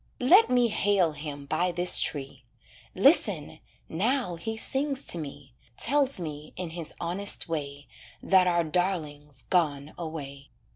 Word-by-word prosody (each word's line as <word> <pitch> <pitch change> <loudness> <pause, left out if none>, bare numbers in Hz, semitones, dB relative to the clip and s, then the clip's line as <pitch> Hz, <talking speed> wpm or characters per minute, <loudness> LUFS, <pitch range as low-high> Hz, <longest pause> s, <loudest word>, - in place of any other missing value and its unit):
Let 365 - +6
me 245 -2 +3
hail 200 -5 +2
him 145 -1 -8
by 170 +5 0
this 175 +1 +3
tree. 135 -2 -3 0.5
Listen! - - +3 0.3
now 220 +3 -1
he 220 +7 -5
sings 275 +3 -1
to 170 - +2
me, 140 -3 -9 0.2
Tells 275 -2 +2
me, 150 -3 -7
in 180 -3 -6
his 165 -2 -6
honest 185 +4 -1
way, 145 -3 -5 0.3
That 185 -1 +3
our 175 -1 +2
darling's 150 -5 -3
gone 150 -5 0
away. 140 -4 -7
170 Hz, 135 wpm, -27 LUFS, 145-200 Hz, 0.5 s, Let